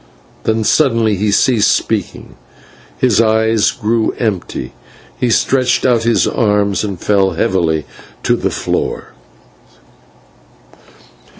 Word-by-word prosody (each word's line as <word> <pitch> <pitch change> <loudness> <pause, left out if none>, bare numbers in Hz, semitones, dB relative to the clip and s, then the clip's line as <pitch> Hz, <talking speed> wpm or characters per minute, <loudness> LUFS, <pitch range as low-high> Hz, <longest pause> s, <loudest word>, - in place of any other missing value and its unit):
Then 110 0 0
suddenly 115 -2 +2
he 105 +2 -1
ceased 105 +1 +3
speaking, 105 -5 -3 0.6
his 115 - +2
eyes 110 -1 +2
grew 110 -1 -1
empty, 95 - -3 0.5
he 125 - 0
stretched 125 +3 +1
out 120 -3 +3
his 115 -1 +2
arms 105 -3 0
and 100 -4 -4
fell 100 -1 +1
heavily 80 -5 0 0.4
to - - +2
the - - -2
floor. - - -3
110 Hz, 105 wpm, -15 LUFS, 100-115 Hz, 0.6 s, ceased